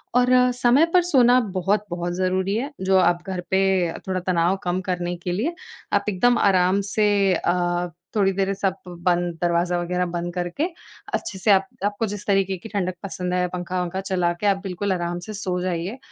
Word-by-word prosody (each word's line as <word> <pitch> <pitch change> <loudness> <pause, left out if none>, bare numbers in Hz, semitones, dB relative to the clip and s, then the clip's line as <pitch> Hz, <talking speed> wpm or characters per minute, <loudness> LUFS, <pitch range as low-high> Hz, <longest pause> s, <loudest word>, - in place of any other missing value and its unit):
और 250 0 +4 0.2
समय 250 +5 +4
पर 365 - +6
सोना 255 -7 +5 0.2
बहुत-बहुत 185 -2 -1
ज़रूरी 185 +2 0
है, 265 +6 -2
जो 190 0 +3
आप 175 -1 +3
घर 185 -2 -3
पे 190 -3 +2 0.2
थोड़ा 185 -1 -1
तनाव 180 +1 +2
कम 180 +1 -1
करने 180 -1 -2
के 180 - -2
लिए, 240 - -1 0.4
आप - - +2
एकदम 240 +5 +3
आराम 190 0 +3
से 215 -1 +3 0.3
अ, 175 0 0 0.3
थोड़ी 195 -2 +3
देर 195 +1 0
सब 195 -1 -1 0.3
बंद 175 -1 +2
दरवाज़ा 175 0 +1
वगैरह 180 +1 -1
बंद 175 0 -3
करके, 175 - -2 0.5
अच्छे 210 - -3
से 210 - +3
आप 195 -1 +4 0.2
आपको 205 +2 0
जिस 205 -1 -6
तरीके 195 -1 +1
की 200 +6 -10
ठंडक 190 -3 -1
पसंद 180 -2 -4
है 180 0 +1
पंखा-वंखा 180 +1 -3
चला 185 -3 0
के, 190 +4 -2
आप 200 -1 +3
बिल्कुल 190 +1 -2
आराम 175 -1 -3
से 215 - -5
सो 185 -3 -2
जाइए। 180 +5 -3
185 Hz, 180 wpm, -23 LUFS, 175-200 Hz, 0.5 s, पर